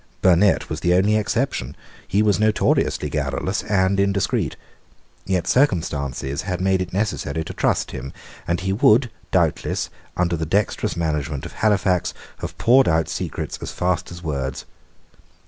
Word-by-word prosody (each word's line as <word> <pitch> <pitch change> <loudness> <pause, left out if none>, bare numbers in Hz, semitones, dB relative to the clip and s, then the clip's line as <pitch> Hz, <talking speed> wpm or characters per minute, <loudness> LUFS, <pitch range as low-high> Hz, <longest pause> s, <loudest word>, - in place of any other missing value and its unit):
Burnet 95 +2 +4
was 80 - -4
the 90 +3 +2
only 100 +4 +3
exception. 110 - -1 0.3
He 100 +4 +2
was 105 -1 +2
notoriously 110 -7 +2
garrulous 75 +7 -2
and 100 -1 +1
indiscreet. 100 0 +1 0.7
Yet 95 -3 0
circumstances 70 - 0
had 90 -2 -3
made 95 0 +2
it 90 -2 -4
necessary 90 -6 -1
to - - -7
trust - - 0
him; 70 - -6 0.4
and 85 +1 0
he 95 +1 0
would 115 +4 +4 0.2
doubtless, - - 0 0.3
under 85 -1 +1
the 80 -1 -3
dexterous 100 0 0
management 75 -2 -2
of 85 - -7
Halifax, 95 -4 +1 0.2
have - - -6
poured 130 +3 +5
out 80 -1 +2
secrets - - -4
as - - -5
fast 90 -1 -1
as 85 +1 -10
words. 70 -3 -3
90 Hz, 145 wpm, -22 LUFS, 80-100 Hz, 0.7 s, poured